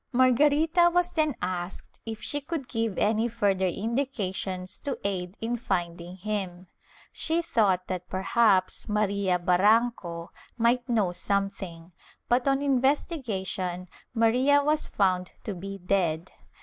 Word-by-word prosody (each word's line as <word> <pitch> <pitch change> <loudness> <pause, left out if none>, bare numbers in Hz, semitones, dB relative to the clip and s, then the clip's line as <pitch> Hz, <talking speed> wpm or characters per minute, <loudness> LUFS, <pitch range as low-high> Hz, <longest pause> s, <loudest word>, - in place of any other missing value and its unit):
Margarita 295 +7 +4
was 355 0 +2
then 310 -4 +1
asked 180 0 -4
if 220 -1 -5
she 290 - -1
could 300 -3 -4
give 225 -5 -2
any 220 +2 +2
further 200 -5 +1
indications 195 -4 -3
to 280 - -3
aid 185 -1 -3
in 235 +2 -1
finding 175 -5 -3
him: 190 -2 -4 0.5
she 325 +1 -1
thought 195 - +2
that 180 -1 -5
perhaps 190 0 +2
Maria 200 -3 +1
Barranco 180 -1 +2 0.3
might 240 +1 +2
know 215 -6 +2
something, 185 -3 -3 0.4
but 245 +2 +2
on 275 +1 +2
investigation 240 - -1 0.3
Maria 255 +6 +4
was 305 +1 +1
found 185 -2 0
to 210 - -3
be 195 +2 -7
dead. 180 -3 0
210 Hz, 125 wpm, -27 LUFS, 185-250 Hz, 0.5 s, Margarita